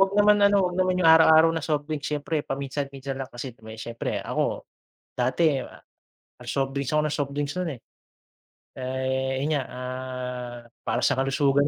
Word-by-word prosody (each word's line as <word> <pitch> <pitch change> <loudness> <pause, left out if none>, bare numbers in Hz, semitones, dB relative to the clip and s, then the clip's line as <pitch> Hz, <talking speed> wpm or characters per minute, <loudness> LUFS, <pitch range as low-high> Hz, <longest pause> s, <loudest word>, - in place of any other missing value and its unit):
wag 195 0 +5
naman 205 0 +5
ano, 200 -1 +5
wag 180 -1 -1
naman 185 0 +2
yung 165 -3 +5
araw-araw 160 0 +7
na 165 - -2
soft 150 -1 -1
drinks. 150 -2 -4
Siyempre 150 +1 -1
paminsan-minsan 135 0 -4
lang 130 - -4
kasi 120 +1 -7 0.2
siyempre 115 +1 -4
ako - - -1 0.5
dati 140 +4 +2 0.9
soft 135 0 0
drinks 140 -1 -2
ako 150 - +4
nang 150 - -1
soft 140 -1 -1
drinks 145 -1 -1
nun, 165 -6 -2
eh. - - -15 1.0
Eh, 130 +1 -1
yun 155 +1 +1
nga, 135 - 0
ah, 125 -1 -5 0.3
para 120 - 0
sa 135 - +3
kalusugan 140 +1 +2
140 Hz, 165 wpm, -26 LUFS, 130-160 Hz, 1.0 s, araw-araw